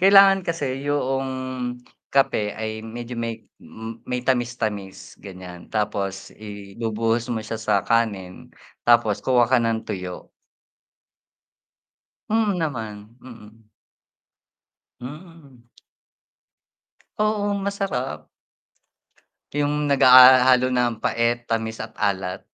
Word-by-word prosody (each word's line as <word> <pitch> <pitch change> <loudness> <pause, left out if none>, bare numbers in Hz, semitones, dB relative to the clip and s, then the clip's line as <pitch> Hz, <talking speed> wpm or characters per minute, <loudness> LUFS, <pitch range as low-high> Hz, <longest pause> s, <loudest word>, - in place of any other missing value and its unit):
Kailangan 195 0 +7
kasi 140 -6 -3
yoong 135 -2 -1 0.8
kape 110 -6 +2
ay 110 0 -5
medyo 120 +2 -7
may 115 -1 -5 0.6
may 125 0 -2
tamis-tamis, 115 -6 -2
ganyan. 90 -3 -10
Tapos 100 -2 -3
ibubuhos 110 +3 -3
mo 115 - -1
siya 110 +1 -5
sa 110 -1 0
kanin, 100 -6 -1 0.4
tapos 115 -3 +3
kuha 125 -2 +3
ka 130 +2 +3
ng 115 -1 -1
tuyo. 90 -1 -6 2.0
Hmm, 215 -3 +1
naman, 115 -9 -5
mm. 110 -3 -15 1.3
Hmm. 145 -2 -12 1.5
Oo, 210 -1 +1
masarap. 195 -11 -3 1.3
Yung 145 0 0
nag 140 - +2
haha 130 0 +9
halo 130 0 +4
na 125 -1 +2
ang 115 - -5
pait, 120 0 +1
tamis 115 -1 -2
at 110 0 -8
alat. 95 -2 -1
120 Hz, 100 wpm, -23 LUFS, 110-135 Hz, 2.0 s, haha